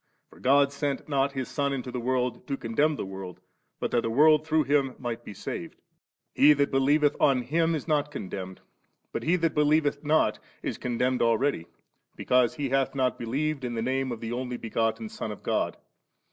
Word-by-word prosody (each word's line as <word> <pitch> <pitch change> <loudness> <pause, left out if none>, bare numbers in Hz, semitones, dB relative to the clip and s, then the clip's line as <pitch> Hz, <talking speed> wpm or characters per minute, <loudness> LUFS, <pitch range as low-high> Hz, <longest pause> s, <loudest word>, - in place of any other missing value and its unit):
For - - -17
God 140 +2 +4
sent 140 -1 -3
not 140 -1 +1
His 130 -3 -3
Son 140 -1 -1
mto 130 -2 -4
the 125 - -2
world 125 0 -1
to 140 -2 -2
condemn 145 +8 +1
the - - -4
world, 95 -2 -8 0.4
but - - -2
that 120 - +2
the 115 - -2
world 155 +5 +4
through 160 -1 +3
Him 135 -2 +1
might 120 -2 -5
be 105 - -9
saved. - - -6 0.6
He 150 +2 +7
that 140 -1 +1
believeth 145 +2 +3
on 130 -3 +3
Him 165 +5 +1
is 155 - -5
not 150 -2 +1
condemned, 95 -8 -6 0.5
but - - -2
he 170 +3 +2
that 165 -3 0
believeth 150 -1 +2
not 155 +1 +2 0.2
is - - -3
con 120 -2 -3
demned 125 +1 +1
already, 115 -6 +1 0.5
because 125 -2 +2
he 140 -2 -2
hath 135 +1 +1
not 130 -3 0
believed 140 +4 -2
in 120 -1 -3
the 115 - -2
Name 130 +1 -1
of 115 - -6
the 115 0 -4
Only 125 0 -3
begotten 115 - -1
Son 215 - -5
of 105 - -9
God. - - -1
135 Hz, 200 wpm, -27 LUFS, 120-145 Hz, 0.6 s, He